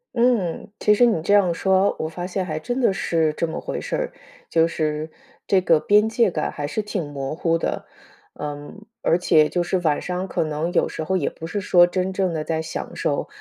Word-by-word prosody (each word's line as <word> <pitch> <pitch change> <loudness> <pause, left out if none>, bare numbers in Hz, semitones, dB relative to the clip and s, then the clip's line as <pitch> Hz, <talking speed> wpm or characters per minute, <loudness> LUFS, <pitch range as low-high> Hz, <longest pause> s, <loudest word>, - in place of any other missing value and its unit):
嗯， 225 -6 +1
其 210 - +4
实 240 +3 +5
你 190 -9 0
这 200 - +2
样 195 -4 +5
说 190 +3 +2
哦， - - -1
我 155 - -2
发 175 +3 -5
现 185 0 -2
还 155 -3 -3
真 245 +8 -3
的 235 -6 +3
是 160 -4 0
这 170 - -1
么 160 - -4
回 - - -4
事 - - -3
儿， - - -3 0.3
就 165 0 +3
是 155 -1 -2 0.4
这 195 - +4
个 165 -3 +4
边 210 +6 +4
界 225 -1 +2
感 155 -4 -2
还 145 -1 -4
是 215 +8 -2
挺 200 -4 -3
模 135 0 -4
糊 165 0 +1
的。 - - -3 0.5
嗯， 145 +8 -7 0.2
而 165 - +3
且 155 -4 +4
就 175 - 0
是 180 +2 0
晚 155 -4 +1
上 180 +1 -3
可 - - -1
能 155 +2 -2
有 - - +2
时 160 - -5
候 190 +4 0
也 155 - -1
不 165 - -8
是 205 +4 -3
说 175 -2 +5
真 185 +1 -2
正 185 -2 0
地 155 -2 -2
在 160 0 -2
享 160 0 -6
受， - - -1
175 Hz, 245 characters per minute, -22 LUFS, 155-195 Hz, 0.5 s, 实